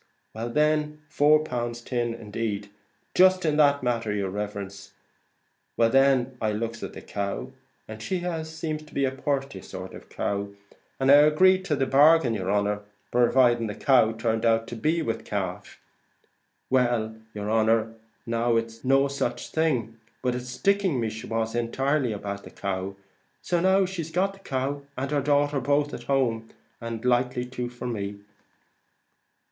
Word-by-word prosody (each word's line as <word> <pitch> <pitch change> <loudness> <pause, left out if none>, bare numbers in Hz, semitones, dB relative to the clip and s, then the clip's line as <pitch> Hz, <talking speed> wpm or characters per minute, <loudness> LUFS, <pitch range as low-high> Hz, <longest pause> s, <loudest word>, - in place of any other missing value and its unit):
well 115 +2 -4
then, 150 +3 +1
four 150 0 +4
pound 120 -4 -3
tin 120 -2 -1
indeed,' 105 -2 -4 0.4
jist 185 -1 +5
in 155 -2 +2
that 145 -2 +4
manner, 115 -3 0
yer 100 -2 -1
riverence. 100 -1 -6 0.8
Well 115 -1 +4
then 135 -1 +3
I 110 -1 +1
looks 115 +1 -4
at - - -6
the - - -10
cow, 100 +5 -4 0.4
and 110 0 -8
she 180 - -2 0.2
seemed 155 -1 -5
a 135 -1 +2
purty 135 -6 -3
sort 95 0 -8
of - - -9
a - - -21
cow, 100 0 -2 0.5
and 135 0 +4
I 145 - +10
agreed 185 +6 +5
to 155 - +1
the 135 -1 +1
bargain, 145 -2 +5
yer 95 -3 -3
honer, 105 0 +1 0.3
purviding 120 -1 +3
the 105 - -5
cow 125 -5 +4
turned 110 0 -1
out 115 -1 +3
to 120 - -5
be 160 +8 0
with 115 -5 -3
calf. 100 -1 -4 0.9
Well, 120 -4 +1 0.2
yer 105 0 -4
honer, 110 0 +2 0.3
now 115 0 +1
it's 115 0 -2
no 135 +1 +4
such 135 -3 -3
thing, 125 -9 0 0.2
but 125 -1 +1
it's 125 0 -5
sticking 185 +3 +1
me 115 -2 -1
she 110 +1 -8
was 115 0 -1
entirely 130 +3 0
about, 100 -1 -5
the - - -10
cow: 95 0 -4 0.5
so 175 -1 +1
now 190 +2 +4
she 185 -2 -4
got 190 +3 +1
the 195 - -16
cow 140 -4 -3 0.2
and 135 +2 -3
her 145 -1 +1
daughter 145 0 +2
both 145 +3 +1
at 120 - -7
home; 120 -4 0 0.3
and 115 0 -5
likely 125 0 +1
to 125 -1 -5
for 120 0 -9
me." 100 -4 -3
120 Hz, 165 wpm, -26 LUFS, 110-145 Hz, 0.9 s, I